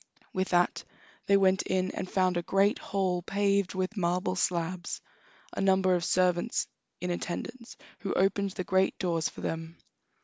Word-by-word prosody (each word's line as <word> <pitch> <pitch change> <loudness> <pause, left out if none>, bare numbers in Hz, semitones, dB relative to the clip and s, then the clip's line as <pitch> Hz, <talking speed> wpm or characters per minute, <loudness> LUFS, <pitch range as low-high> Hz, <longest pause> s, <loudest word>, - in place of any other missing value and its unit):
With 185 0 -1
that 175 0 +2 0.4
they 200 - +6
went 190 -1 +4
in 185 0 0
and 185 - -5
found 185 -1 +2
a 175 - +1
great 195 +4 +2
hall 190 -2 -1
paved 200 0 +1
with 185 +3 -1
marble 185 0 0
slabs, 175 -1 -1 0.5
and - - -1
numbers 190 -1 +4
of 170 - -3
servants 180 -1 +2 0.4
in 180 0 -1
attendance, 230 +8 -5 0.2
who 195 - -3
opened 195 +1 +2
the 185 - -3
great 190 +1 +2
doors 170 -3 0
for - - -11
them. 165 +1 -4
185 Hz, 160 wpm, -29 LUFS, 175-195 Hz, 0.5 s, they